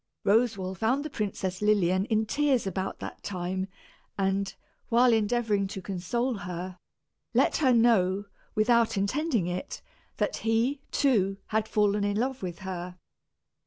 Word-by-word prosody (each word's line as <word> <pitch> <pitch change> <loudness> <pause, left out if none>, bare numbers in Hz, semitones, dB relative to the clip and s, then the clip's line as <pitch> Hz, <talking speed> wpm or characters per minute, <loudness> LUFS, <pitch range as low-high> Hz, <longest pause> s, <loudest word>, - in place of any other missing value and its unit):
Roswal 200 -3 +2
found 250 - 0
the 305 - -5
Princess 190 -4 -3
Lilian 195 -3 +3
in 220 0 +1
tears 275 -1 +1
about 190 0 -3
that - - -7
time 185 0 -3 0.5
and, 195 0 0 0.3
while 240 +1 +5
endeavoring 220 -2 +1
to 190 - -6
console 200 +7 -2
her, 180 -1 -6 0.6
let - - +3
her 270 -4 +3
know, 205 -5 +3 0.3
without 230 0 +3
intending 235 - 0
it, 180 +1 -5 0.3
that - - 0
he, 230 +5 +1
too, 200 -9 +2
had 220 0 0
fallen 210 -1 +2
in 205 0 0
love 260 +3 -1
with 175 -3 -4
her. 180 -1 -5
205 Hz, 135 wpm, -28 LUFS, 190-235 Hz, 0.6 s, while